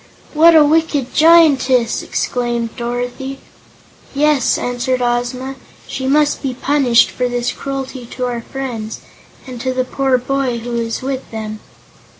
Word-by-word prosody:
"What 325 +2 +6
a 305 -2 +7
wicked 295 -4 +1
Giantess!" 285 -7 +4
exclaimed 240 -2 -2
Dorothy. 245 +3 -4 0.8
"Yes," 290 -2 +2
answered 245 +1 -1
Ozma, 245 +2 -2 0.3
"she 260 0 -4
must 295 +2 +2
be 265 -3 -3
punished 260 -3 +3
for 250 -1 -1
this 245 0 -1
cruelty 270 -2 -6
to 250 +1 -4
our 240 -1 -3
friends, 235 -4 -6 0.4
and 250 -3 -8
to 260 0 -2
the 255 0 0
poor 265 0 +1
boy 260 -1 -1
who 240 +1 -6
is 230 +1 -3
with 265 0 -4
them." 215 -1 -6
255 Hz, 140 wpm, -17 LUFS, 240-275 Hz, 0.8 s, a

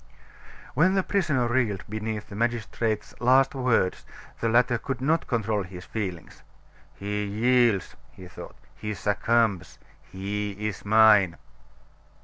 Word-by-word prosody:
When 185 +7 +3
the 190 - +2
prisoner 155 - +1
reeled 120 -6 0
beneath 110 0 -4
the 100 - -9
magistrate's 115 -1 -2
last 130 +2 +4
words, 125 -8 +1 0.4
the 115 - 0
latter 120 +1 +3
could 135 0 -4
not 155 +5 +1
control 110 -3 0
his 90 -1 -9
feelings. 95 -7 -6 0.5
"He 105 +1 -3
yields," 115 -1 +2
he 90 +3 -13
thought, 90 - -11 0.2
"he 105 0 -5
succumbs 105 0 0 0.3
he 100 +2 -3
is 105 0 -5
mine!" 105 -4 +5
110 Hz, 125 wpm, -26 LUFS, 100-120 Hz, 0.5 s, mine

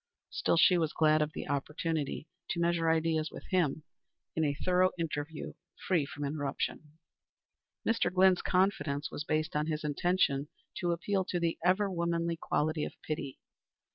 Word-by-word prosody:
Still, - - +1
she 180 +1 +6
was 160 -2 0
glad 155 -1 +4
of 150 0 0
the - - -5
opportunity 150 +1 -2 0.2
to 170 - -1
measure 170 -1 +2
ideas 160 -1 +1
with - - -10
him 165 -5 +1 0.5
in 160 - +1
a 145 -2 +1
thorough 185 0 +4
interview 155 -2 -4 0.3
free 165 -7 +2
from 145 +1 -6
interruption. 145 +1 -3 0.9
Mr. 225 -4 +2
Glynn's 185 0 +5
confidence 155 -7 +1
was 145 - -4
based 155 +1 -1
on 150 +1 +1
his 155 -1 -2
intention 150 -2 +1 0.3
to 175 -1 0
appeal 190 +3 0
to 180 - -1
the 170 -1 -1
ever 185 +3 +3
womanly 170 -2 -1
quality 155 -1 0
of - - -4
pity. 140 -3 -4
160 Hz, 155 wpm, -31 LUFS, 150-175 Hz, 0.9 s, she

